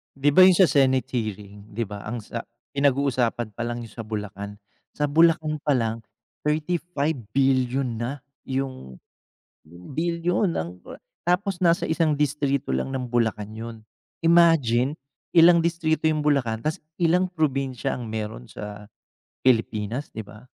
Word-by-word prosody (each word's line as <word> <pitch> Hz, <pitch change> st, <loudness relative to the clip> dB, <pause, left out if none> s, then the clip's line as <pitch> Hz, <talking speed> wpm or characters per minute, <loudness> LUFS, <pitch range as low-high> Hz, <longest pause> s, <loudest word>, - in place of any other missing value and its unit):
'Di 140 Hz, +2 st, +2 dB
ba 185 Hz, +4 st, +9 dB
'yun 185 Hz, -, +7 dB
sa 185 Hz, -2 st, +5 dB
senate 130 Hz, -2 st, +3 dB
hearing, 105 Hz, -2 st, -5 dB
'di 115 Hz, -, -1 dB
ba, 100 Hz, 0 st, -7 dB
ang 115 Hz, +1 st, -4 dB
sa 115 Hz, +2 st, -6 dB, 0.3 s
pinag-uusapan 130 Hz, -5 st, +1 dB
palang 120 Hz, 0 st, -3 dB
do'n 115 Hz, -, -9 dB
sa 115 Hz, -1 st, -8 dB
Bulacan. 105 Hz, -2 st, -5 dB, 0.4 s
Sa 150 Hz, -, 0 dB
Bulacan 155 Hz, -1 st, +3 dB
palang 115 Hz, -5 st, +1 dB, 0.4 s
35 155 Hz, -1 st, -1 dB, 0.2 s
bilyon 130 Hz, -2 st, +1 dB
na 125 Hz, +4 st, -4 dB, 0.2 s
'yung 130 Hz, -, -4 dB, 0.7 s
bilyon 170 Hz, -, -1 dB
ang 85 Hz, +2 st, -5 dB
kora -, -, -11 dB, 0.2 s
tapos 185 Hz, +1 st, 0 dB
nasa 170 Hz, -1 st, +3 dB
isang 160 Hz, -2 st, +1 dB
distrito 140 Hz, -, 0 dB
lang 65 Hz, -, -1 dB
ng 130 Hz, -1 st, -3 dB
Bulacan 110 Hz, -3 st, -1 dB
'yun. 110 Hz, 0 st, -8 dB, 0.4 s
Imagine, 155 Hz, -6 st, +4 dB, 0.4 s
ilang 170 Hz, +1 st, +8 dB
distrito 160 Hz, -2 st, +1 dB
'yung 155 Hz, -1 st, -1 dB
Bulacan, 130 Hz, -7 st, +2 dB
tas 155 Hz, -, -1 dB, 0.2 s
ilang 180 Hz, +2 st, +2 dB
probinsya 135 Hz, -7 st, -1 dB
ang 120 Hz, -3 st, -6 dB
meron 105 Hz, -, -5 dB
sa 105 Hz, 0 st, -8 dB, 0.5 s
Pilipinas, 115 Hz, +1 st, 0 dB
'di 110 Hz, -2 st, -7 dB
ba? 105 Hz, +3 st, -13 dB
130 Hz, 135 wpm, -24 LUFS, 110-155 Hz, 0.7 s, ba